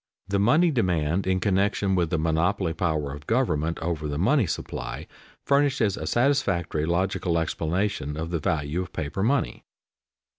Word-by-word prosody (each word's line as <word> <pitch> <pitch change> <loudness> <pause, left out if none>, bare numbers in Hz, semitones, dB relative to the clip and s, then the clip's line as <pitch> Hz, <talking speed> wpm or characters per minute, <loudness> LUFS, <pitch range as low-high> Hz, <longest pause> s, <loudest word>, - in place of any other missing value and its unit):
The 100 0 0
money 155 - +4
demand 90 - 0
in 95 0 +2
connection 100 0 +1
with 85 -3 +1
the 90 - 0
monopoly 80 +3 +1
power 80 -5 -1
of 75 0 -10
government 85 - +1
over 80 -2 -2
the 70 -1 -3
money 110 - +3
supply, 60 -5 -5 0.4
furnishes 140 -7 +2
a - - -5
satisfactory 100 - +1
logical 85 0 0
explanation 80 -2 -1
of 80 +1 -4
the 85 - 0
value 75 +1 -1
of 95 - -8
paper 80 +3 -3
money. 110 - 0
90 Hz, 150 wpm, -25 LUFS, 80-100 Hz, 0.4 s, money